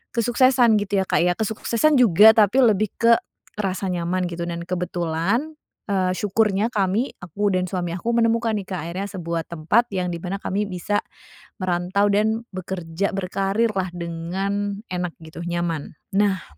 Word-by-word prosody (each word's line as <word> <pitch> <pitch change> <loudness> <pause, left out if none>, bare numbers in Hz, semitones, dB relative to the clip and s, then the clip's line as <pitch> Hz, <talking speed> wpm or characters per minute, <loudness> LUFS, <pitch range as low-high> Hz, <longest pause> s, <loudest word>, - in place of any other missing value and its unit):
kesuksesan, 240 0 +4
gitu, 205 -1 0
ya, - - -11
Kak, - - +2
ya. 180 - +3
Kesuksesan 225 +7 +1
juga 220 -1 +8
tapi 220 +4 +4
lebih 215 -3 +3
ke 230 0 +5 0.4
rasa 195 -1 -1
nyaman, 180 +1 -1
gitu, 170 0 -5
dan 170 0 -4
kebetulan, 180 - -1 0.3
eee, 190 -2 +1
syukurnya 210 +1 +1
kami, 205 +4 0
aku 200 +4 -1
dan 185 0 0
suami 175 -1 -3
aku, 230 +6 -2
menemukan, 230 -1 +2
nih, 200 -3 -4
Kak, 180 - -2
akhirnya 190 +4 -4
sebuah 170 -3 -3
tempat 170 +9 +1
yang 180 -1 0
di 170 - -4
mana 185 +3 -4
kami 200 +1 -1
bisa 190 +2 -2 0.6
merantau 185 +2 +1
dan 220 +3 +1
bekerja, 185 0 -3
berkarir, 195 +4 0
lah, 190 -1 -1
dengan 190 +4 -3
enak, 180 -1 -2
gitu, 160 +2 -9
nyaman. 170 -3 -2 0.2
Nah 195 -4 +2
195 Hz, 155 wpm, -23 LUFS, 175-215 Hz, 0.6 s, juga